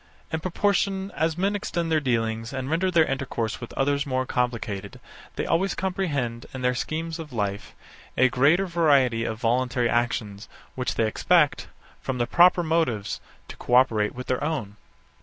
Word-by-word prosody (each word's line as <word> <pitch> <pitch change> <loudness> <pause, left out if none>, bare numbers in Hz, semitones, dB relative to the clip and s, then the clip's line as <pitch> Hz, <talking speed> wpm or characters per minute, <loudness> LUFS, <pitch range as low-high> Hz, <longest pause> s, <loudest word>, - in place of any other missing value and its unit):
In 160 - 0
proportion 195 +2 0
as 160 +1 -1
men 195 +3 +1
extend 170 -4 -2
their 155 - +4
dealings, 115 -3 -1
and 130 +1 -4
render 180 +3 +1
their 165 -3 +4
intercourse 130 -5 -3
with 120 - -7
others 140 +1 +1
more 130 -1 0
complicated, 115 -6 -3 0.4
they - - -2
always 180 +3 +1
comprehend, 145 -12 -2
in 130 - -5
their 125 0 +2
schemes 160 +5 -3
of 155 -3 -8
life, 100 -5 -3 0.4
a 130 - +6
greater 145 +10 +3
variety 140 -10 +3
of 110 0 -4
voluntary 125 +1 +1
actions, 110 -3 -1 0.2
which 125 -1 -2
they 115 - +2
expect, 150 +7 +2 0.3
from 135 -1 -3
the 120 - +1
proper 175 +6 +5
motives, 160 -11 0 0.3
to - - -9
co 125 - 0
operate 110 -5 +3
with 125 0 -6
their 130 +1 -1
own. 135 -10 -3
130 Hz, 165 wpm, -25 LUFS, 120-165 Hz, 0.4 s, a